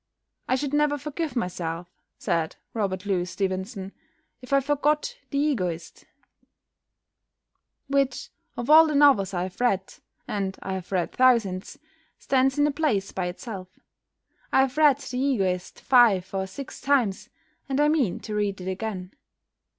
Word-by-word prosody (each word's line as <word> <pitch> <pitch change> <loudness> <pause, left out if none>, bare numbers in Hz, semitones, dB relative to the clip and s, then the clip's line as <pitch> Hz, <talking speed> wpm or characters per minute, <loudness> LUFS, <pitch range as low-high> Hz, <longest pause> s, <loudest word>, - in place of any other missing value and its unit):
"I 255 - +2
should 280 +1 -3
never 295 0 +2
forgive 300 +2 -4
myself," 175 -5 -3 0.3
said 160 -1 -1 0.2
Robert 195 -3 -2
Louis 185 -3 0
Stevenson, 190 +1 -3 0.5
"if 250 - -12
I 275 - +5
forgot 295 - 0
'The 280 - -2
Egoist,' 185 - -2 1.8
which, 275 -2 0 0.3
of 240 - -4
all 320 +2 +8
the 305 - -1
novels 275 -10 +5
I 175 - 0
have 185 +5 -7
read 195 -6 +1 0.3
(and 195 -2 -3
I 190 - -3
have 190 -1 -6
read 180 -3 0
thousands), 230 -7 +2 0.4
stands 265 +1 +1
in 290 - +4
a 295 - +2
place 275 -10 0
by 185 -2 -2
itself. 185 0 -8 0.7
I - - +5
have 265 0 0
read 300 -3 +5
'The 255 -3 -5
Egoist' 195 -10 -1
five 220 -8 +4
or 190 0 -1
six 255 +8 -9
times, 255 -9 +1 0.4
and 270 +1 0
I 295 - +5
mean 290 - +1
to 215 - -6
read 205 -2 -1
it 180 - -7
again." 190 -1 -4
225 Hz, 150 wpm, -25 LUFS, 190-280 Hz, 1.8 s, all